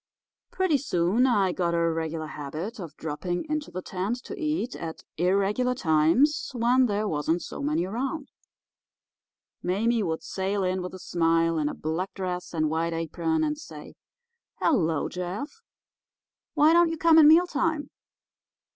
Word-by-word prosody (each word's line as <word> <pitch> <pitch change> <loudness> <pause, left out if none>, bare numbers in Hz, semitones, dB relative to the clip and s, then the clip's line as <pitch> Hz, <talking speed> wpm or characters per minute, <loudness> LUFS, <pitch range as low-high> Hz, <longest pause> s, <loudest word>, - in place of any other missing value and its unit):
"Pretty 365 -7 +1
soon 210 +1 +2
I 200 -7 +2
got 170 -1 0
a - - +2
regular 160 -1 -3
habit 155 - -6
of 165 -5 -8
dropping 175 - -3
into 305 -1 -2
the 185 0 -6
tent 190 +6 -2
to 410 - -7
eat 305 - -2
at 165 -1 -7
irregular 200 +8 +1
times 175 - +2
when 245 +2 +3
there 210 0 -1
wasn't 160 +1 -1
so - - -7
many 150 +4 0
around. 265 - -4 1.3
Mame 220 +5 +1
would 160 0 -3
sail 195 +1 -2
in 185 0 0
with 180 +1 -6
a - - -7
smile, 165 -1 +1
in 150 -1 0
a - - -6
black 165 +5 -3
dress 180 -2 -4
and 155 -2 0
white 165 +2 -1
apron, 240 - -1
and 300 -1 -1
say: 325 - -10 0.6
'Hello, 165 - +1
Jeff 195 - -5 0.9
—why 310 +1 +5
don't 340 0 +5
you 325 - -3
come 325 0 +6
at 310 - +8
mealtime? 315 -2 +3
190 Hz, 150 wpm, -26 LUFS, -, 1.3 s, at